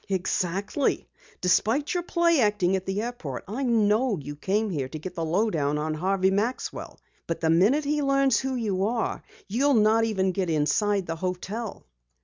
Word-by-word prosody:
"Exactly! 190 - -1 0.3
Despite 225 - +2
your 355 - 0
play 340 -2 +2
acting 205 -4 +2
at 190 0 -4
the 195 +3 -1
airport, 230 - -5
I 220 +8 -4
know 225 -2 +2
you 145 0 -7
came 200 +7 -1
here 135 -6 -3
to 155 - -6
get 180 +4 -7
the 170 -2 -3
low 195 +8 +1
down 150 -3 0
on 155 +1 -2
Harvey 190 +4 +1
Maxwell. 220 +6 -3 0.3
But 165 - -2
the 160 -1 +2
minute 210 - +4
he 295 +1 0
learns 275 -2 +3
who 265 0 -2
you 205 -6 -1
are 230 +1 -1 0.3
you'll 265 +7 +2
not 220 +1 +4
even 190 -4 +1
get 185 -1 -2
inside 190 +6 +1
the 165 -1 -4
hotel." 185 +5 -4
200 Hz, 175 wpm, -26 LUFS, 180-235 Hz, 0.3 s, minute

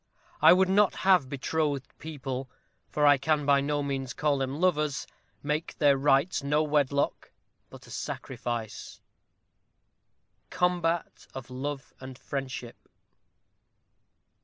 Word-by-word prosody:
I 160 +2 +9
would 185 +1 +5
not 200 +2 +3
have 185 -9 +4
betrothed 145 0 -2
people 135 -4 -5 0.4
for 150 - +1
I 145 -1 +6
can 150 +1 +1
by 140 -1 +4
no 145 +1 -1
means 135 -2 -3
call 145 -2 +1
them 135 +2 -3
lovers 150 -7 +1 0.4
make 150 +2 -2
Their 145 -2 +5
rites 140 +5 +2
no 150 +2 +1
wedlock, 145 -2 0 0.4
but - - -13
a - - -14
sacrifice. 115 -3 -5 1.5
_Combat 175 -2 -1
of 130 -1 -8
Love 135 +2 -5
and 130 -1 -9
Friendship. 135 -4 -5
145 Hz, 115 wpm, -28 LUFS, 135-155 Hz, 1.5 s, I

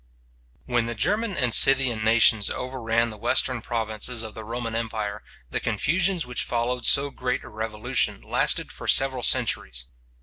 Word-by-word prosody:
When 120 -1 0
the 115 - -4
German 210 - -1
and 125 -4 +1
Scythian 130 -3 +4
nations 110 -2 +4
overran 115 -3 -1
the 105 - -11
western 125 +3 +1
provinces 115 +1 -3
of 110 -1 -7
the 110 - -8
Roman 115 +1 -4
empire, 110 -2 -3 0.3
the - - -1
confusions 180 0 0
which 125 0 -2
followed 120 0 0
so 140 +1 +4
great 125 -1 -3
a - - -11
revolution 110 0 -2
lasted - - -1
for - - -8
several 130 -2 +3
centuries. - - 0
115 Hz, 155 wpm, -25 LUFS, 110-125 Hz, 0.3 s, Scythian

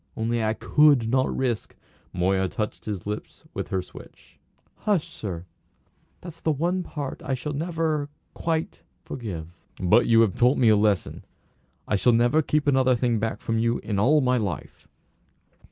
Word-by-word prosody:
Only 115 +1 0
I 110 +1 0
could 145 -6 +4
not 130 +2 +2
risk 125 -4 -2 0.2
" - - -34
Moya 95 +1 +1
touched 105 +2 -4
his 100 -5 -4
lips 105 +1 -6
with - - -4
her 95 -1 -2
switch. - - -15 0.4
"Hush, 175 -6 -1
sir! 90 - -6 0.8
That's 170 -2 -10
the 160 - 0
one 175 +6 0
part 145 -6 -6
I 135 - -1
shall 150 +4 -5
never 160 -1 -1 0.2
quite 160 -1 -2 0.2
forgive." 90 -10 -6 0.3
"But 95 +6 +4
you 115 -1 +6
have 110 -5 +2
taught 125 +3 +3
me 120 -3 +4
a 110 - +6
lesson. 105 -2 0 0.6
I 105 - +1
shall 120 +4 +3
never 120 +7 +3
keep 150 0 0
another 130 -3 +3
thing 120 -2 +1
back 110 0 -3
from 115 0 -1
you 115 +1 +1
in 100 -3 -2
all 145 +8 +4
my 125 -1 +2
life!" 100 -9 -5
120 Hz, 170 wpm, -25 LUFS, 105-150 Hz, 0.8 s, you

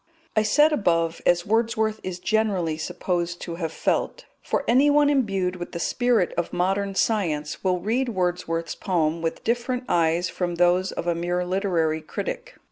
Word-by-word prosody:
I 215 - +4
said 295 +9 +4
above, 165 - +1
"as 175 0 +3
Wordsworth 220 0 +1
is 185 -1 -5
generally 190 -5 0
supposed 175 +2 -3
to 170 -1 -5
have 160 -1 -2
felt"; - - -1 0.2
for - - -1
anyone 290 +4 +4
imbued 195 -9 0
with 175 - -7
the 170 - -4
spirit 240 -1 +1
of 170 - -1
modern 195 +2 0
science 165 -9 0
will 185 -1 +1
read 240 +7 0
Wordsworth's 175 -4 -2
poem 165 -4 -1
with 165 0 -3
different 245 +2 -1
eyes 170 +1 +2
from 175 -1 -3
those 180 +2 +2
of - - -5
a 175 - +1
mere 175 +1 -1
literary 175 -4 0
critic. - - -5
180 Hz, 160 wpm, -24 LUFS, 170-220 Hz, 0.2 s, I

